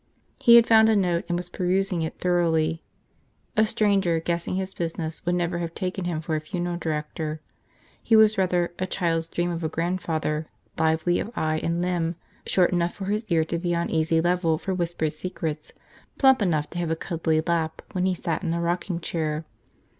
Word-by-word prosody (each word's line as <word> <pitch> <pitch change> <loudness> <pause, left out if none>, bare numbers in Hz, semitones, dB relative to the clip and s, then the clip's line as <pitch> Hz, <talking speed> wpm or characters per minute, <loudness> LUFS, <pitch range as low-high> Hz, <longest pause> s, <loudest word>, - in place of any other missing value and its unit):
He 240 -3 +7
had 235 -1 +8
found 220 -1 +6
a 220 - +4
note 175 -4 +1
and 175 - +1
was 175 0 -4
perusing 185 0 0
it 160 - -4
thoroughly. 165 -2 +1 0.7
A 220 0 +4
stranger 200 -6 +2
guessing 170 +2 -2
his 190 0 -3
business 165 -1 -4
would 175 - +2
never 175 0 -1
have 170 -1 -4
taken 185 0 -3
him 165 -3 -2
for 160 0 -2
a 155 - -1
funeral 175 +2 -3
director. 155 -1 -3 0.6
He 225 - +3
was, 220 0 +6
rather, 180 -3 +1
a 185 - -1
child's 165 -3 0
dream 175 +1 -1
of 170 -1 -4
a 160 - 0
grandfather, 160 -2 -2 0.3
lively 160 +2 +2
of - - -3
eye 155 0 0
and 170 +1 -1
limb, 175 -2 -1 0.3
short 180 -2 +3
enough 175 -1 0
for 195 - -6
his 210 +3 -1
ear 165 -2 +3
to 170 +1 -2
be 175 0 -1
on 170 - -1
easy 160 0 +2
level 175 -1 +2
for 190 +3 -3
whispered 170 -3 -1
secrets, 155 -2 -5 0.5
plump 265 -3 +5
enough 155 -6 +1
to 175 - -4
have 170 -2 -1
a 160 - +1
cuddly 160 -2 -1
lap 165 -1 -1
when 185 0 0
he 185 - +1
sat 165 -1 -2
in 170 -3 -1
a - - -1
rocking 175 +1 -2
chair. 155 -1 -2
170 Hz, 195 wpm, -25 LUFS, 160-185 Hz, 0.7 s, had